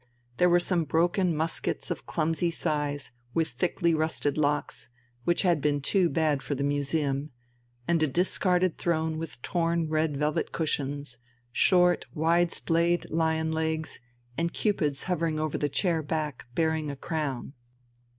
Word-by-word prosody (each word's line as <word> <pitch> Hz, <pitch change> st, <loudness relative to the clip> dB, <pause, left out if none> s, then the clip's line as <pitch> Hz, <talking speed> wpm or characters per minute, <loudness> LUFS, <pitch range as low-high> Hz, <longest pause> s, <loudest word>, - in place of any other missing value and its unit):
There 180 Hz, -, +5 dB
were 175 Hz, 0 st, +5 dB
some 175 Hz, -1 st, +1 dB
broken 175 Hz, +3 st, +2 dB
muskets 160 Hz, +2 st, -2 dB
of -, -, -5 dB
clumsy 165 Hz, +1 st, 0 dB
size 145 Hz, -4 st, -2 dB, 0.2 s
with 165 Hz, -1 st, +2 dB
thickly 170 Hz, +6 st, 0 dB
rusted 155 Hz, -2 st, 0 dB
locks, 150 Hz, -3 st, -1 dB, 0.4 s
which 175 Hz, +3 st, +2 dB
had 175 Hz, -5 st, +3 dB
been 145 Hz, 0 st, +1 dB
too 175 Hz, +5 st, +2 dB
bad 155 Hz, -4 st, +1 dB
for 145 Hz, -, -3 dB
the 140 Hz, -, -2 dB
museum, 145 Hz, 0 st, 0 dB, 0.6 s
and 170 Hz, -1 st, +2 dB
a 155 Hz, -, +4 dB
discarded 180 Hz, +3 st, +1 dB
throne 160 Hz, -2 st, 0 dB
with 160 Hz, -6 st, -6 dB
torn 170 Hz, -2 st, 0 dB
red 155 Hz, -2 st, +1 dB
velvet 150 Hz, +1 st, 0 dB
cushions, 145 Hz, -5 st, -2 dB, 0.3 s
short 180 Hz, +5 st, +3 dB
wide 170 Hz, +2 st, +3 dB
splayed 170 Hz, +1 st, +1 dB
lion 160 Hz, 0 st, +1 dB
legs, 160 Hz, 0 st, -2 dB, 0.4 s
and 170 Hz, +1 st, 0 dB
cupids 150 Hz, -10 st, 0 dB
hovering 165 Hz, -3 st, -1 dB
over 155 Hz, -1 st, -1 dB
the 145 Hz, -, 0 dB
chair 170 Hz, +1 st, +1 dB
back, 150 Hz, -2 st, -3 dB
bearing 160 Hz, -2 st, +1 dB
a 140 Hz, -, -4 dB
crown. 140 Hz, -3 st, -3 dB
160 Hz, 145 wpm, -28 LUFS, 150-170 Hz, 0.6 s, There